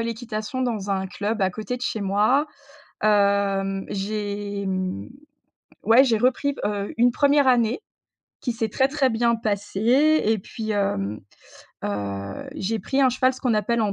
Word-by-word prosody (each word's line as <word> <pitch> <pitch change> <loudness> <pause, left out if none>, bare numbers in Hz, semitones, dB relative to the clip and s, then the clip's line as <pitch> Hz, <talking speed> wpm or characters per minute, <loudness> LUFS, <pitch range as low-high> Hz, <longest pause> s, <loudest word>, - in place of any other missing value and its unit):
l'équitation 230 +1 -3
dans 215 -5 -2
un 190 -1 -1
club 205 +3 -3
à 190 - +2
côté 215 +5 -4
de 245 - -10
chez 220 - -2
moi, 210 +9 +2 0.6
hem, 200 -2 +2
j'ai, 205 0 -3
mmh 185 - -3 0.8
ouais 230 +4 +6
j'ai 230 -5 +2
repris, 260 +4 +1
heu, 205 -1 -2
une 245 +1 +4
1re 285 +1 +3
année, 245 - +3 0.6
qui 245 - -1
s'est 225 -1 -2
très, 265 +5 +2
très 275 -1 +1
bien 235 0 +2
passée 225 +8 +2
et 220 +1 +2
puis, 220 +3 -5
hem, 105 - -1 0.7
heu, 100 -1 -4
j'ai 220 +4 -2
pris 265 +7 -1
un 265 - +5
cheval. 255 +1 +2
Ce 255 - -12
qu'on 250 -4 +1
appelle 220 +3 +1
en 205 -2 0
215 Hz, 160 wpm, -24 LUFS, 200-245 Hz, 0.8 s, ouais